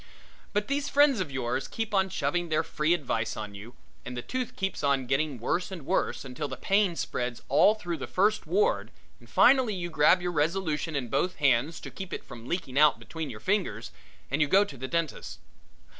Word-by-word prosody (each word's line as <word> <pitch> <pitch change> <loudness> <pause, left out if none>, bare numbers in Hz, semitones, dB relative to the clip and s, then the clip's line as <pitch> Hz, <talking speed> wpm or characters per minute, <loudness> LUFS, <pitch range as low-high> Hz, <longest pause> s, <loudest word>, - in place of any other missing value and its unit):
But 205 0 -1
these 280 +1 -1
friends 285 -5 +4
of 180 -5 -2
yours 130 -1 -2
keep 225 -1 -4
on 190 -1 +2
shoving 175 -1 -1
their 155 - +2
free 155 +3 +1
advice 115 -8 -2
on 105 -2 -6
you 105 +5 -11 0.3
and 125 0 -7
the 120 - -4
tooth 255 -1 -4
keeps 190 -5 -3
on 140 -2 +2
getting 140 +2 0
worse 175 - -1
and 175 -7 -8
worse - - -1
until 135 +3 -4
the - - -6
pain 195 -3 +2
spreads 125 -6 -3
all 200 +9 +5
through 175 -6 -4
the - - -6
First 210 +3 +1
Ward 425 +6 +1 0.3
and - - -18
finally 255 -6 +5
you 175 -1 -4
grab 155 +4 +5
your 175 0 -2
resolution 160 0 -1
in 130 -3 -2
both 180 +9 0
hands 140 +2 +2
to - - -8
keep 190 -2 -7
it - - -5
from 115 0 -11
leaking 145 -7 -1
out 150 -4 +6
between 145 +7 -6
your 110 -4 -8
fingers 115 - -1 0.4
and 140 +3 +1
you 150 - +4
go 195 +7 +5
to 145 - -10
the 130 +1 -5
dentist's. 165 0 -3
160 Hz, 205 wpm, -28 LUFS, 130-190 Hz, 0.4 s, out